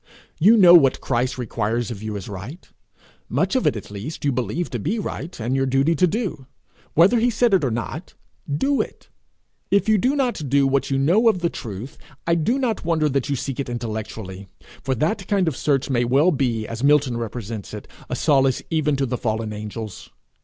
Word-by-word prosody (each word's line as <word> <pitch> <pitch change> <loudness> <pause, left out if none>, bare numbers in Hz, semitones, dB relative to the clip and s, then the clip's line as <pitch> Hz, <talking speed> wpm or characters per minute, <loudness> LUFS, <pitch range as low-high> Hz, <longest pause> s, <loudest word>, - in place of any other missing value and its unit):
You 215 +8 +6
know 180 -4 +8
what 140 -7 +6
Christ 125 +2 -1
requires 115 -1 -2
of 105 -4 -7
you 110 -1 -4
is 100 -2 -6
right 105 - -8 0.6
much - - 0
of 260 - +2
it - - +2
at 105 -1 -8
least 115 +11 -6
you 140 - +3
believe 130 +7 -2
to 120 - -3
be 185 - -1
right, 175 - -5
and 120 +4 -1
your 135 0 +1
duty 135 +5 +2
to 180 +3 +3
do, 180 - -3 0.5
whether 190 +9 +5
he 240 +2 +3
said 235 -1 +2
it 185 - +4
or 135 - +1
not: 120 +9 -5 0.4
do 270 - +1
it. - - -9 0.6
If 200 +1 +2
you 215 -1 +4
do 260 +8 +1
not 245 - -1
do 140 +1 +3
what 135 0 +1
you 135 - +1
know 180 - +4
of 185 -5 0
the 170 - 0
truth, 110 +4 -7 0.3
I 170 - +2
do 170 - +1
not 245 -6 -1
wonder 160 -2 +1
that 140 0 -1
you 140 - +1
seek 135 +1 -4
it 135 - -3
intellectually, 110 -4 -6 0.3
for 130 0 -1
that 180 - -1
kind 195 -4 +1
of 155 - 0
search 140 -1 0
may 125 -3 +1
well 140 +9 +3
be, 120 -7 -1
as 115 +2 -6
Milton 140 -3 +3
represents 115 -3 -5
it, - - -8 0.2
a - - -2
solace 135 -3 +2
even 150 -2 +1
to 135 0 0
the 125 -1 -3
fallen 110 -2 -2
angels. 105 -2 -7
135 Hz, 210 wpm, -22 LUFS, 120-170 Hz, 0.6 s, know